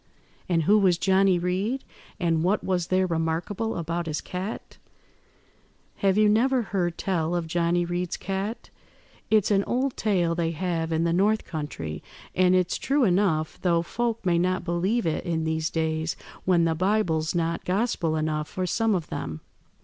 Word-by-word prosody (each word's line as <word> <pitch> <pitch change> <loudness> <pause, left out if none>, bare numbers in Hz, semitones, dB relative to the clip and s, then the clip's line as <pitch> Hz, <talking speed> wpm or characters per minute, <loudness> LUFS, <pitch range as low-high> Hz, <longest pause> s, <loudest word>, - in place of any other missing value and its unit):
"And 165 -2 +2
who 210 +7 +5
was 185 -4 +3
Johnny 190 0 +3
Reed? 190 +9 -1 0.4
and 165 -3 +1
what 195 +4 +1
was 180 -2 0
there 185 0 +2
remarkable 170 +6 -2
about 170 0 -3
his 155 -1 -2
cat?" 185 +4 -6 1.2
"Have 195 0 +2
you 215 0 +5
never 245 +4 +3
heard 180 -5 -2
tell 175 -3 -1
of 170 -1 -1
Johnny 175 +1 +1
Reed's 175 0 -2
cat? 195 +4 -4 0.6
It's 215 -1 +3
an 200 -1 +3
old 260 +2 0
tale 180 -6 +1
they 165 -1 -1
have 165 -1 -2
in 160 0 +1
the 170 0 +1
north 210 +5 +2
country, 80 - -5 0.3
and 185 0 +4
it's 180 -1 +1
true 280 0 +1
enough, 180 -6 +1
though 170 -2 +2
folk 230 +3 -2
may 170 -2 +3
not 185 +1 0
believe 185 +6 0
it 160 - -1
in 165 -3 -1
these 160 0 -1
days 160 0 -1 0.3
when 175 -2 +4
the 165 - +2
Bible's 175 -3 0
not 165 0 -1
gospel 185 -4 0
enough 155 -1 -1
for 185 - -3
some 220 +3 +1
of 170 -4 -2
them. 80 -1 -5
175 Hz, 165 wpm, -26 LUFS, 165-195 Hz, 1.2 s, who